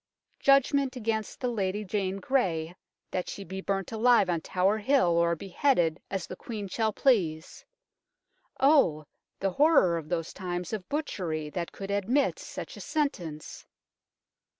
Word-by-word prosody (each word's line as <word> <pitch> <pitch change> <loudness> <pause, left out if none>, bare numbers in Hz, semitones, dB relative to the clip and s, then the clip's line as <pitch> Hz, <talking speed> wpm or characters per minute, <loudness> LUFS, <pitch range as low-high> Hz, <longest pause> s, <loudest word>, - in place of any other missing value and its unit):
" - - -45
Judgment 275 0 +4
against 220 -3 -2
the 255 - -1
Lady 210 -3 -2
Jane 195 -1 -1
Grey, 180 -8 0 0.4
that 180 - -2
she 200 - -6
be 190 +1 -6
burnt 195 -1 -2
alive 225 -4 +4
on 165 -2 -1
Tower 190 +6 +1
Hill 260 -3 +3
or 170 0 +3
beheaded, 175 - +1
as 195 -3 -3
the - - -8
Queen 210 0 -6
shall 220 +3 0
please." 180 - +1 1.0
Oh! 265 - +4 0.4
the 195 0 +1
horror 230 - +4
of 155 -1 -11
those 165 -2 -2
times 180 0 -4
of 195 -5 -5
butchery 170 - -3
that 170 0 -4
could 195 0 -6
admit 215 +8 +1
such - - -7
a - - -8
sentence 175 - -3
195 Hz, 150 wpm, -28 LUFS, 175-240 Hz, 1.0 s, Judgment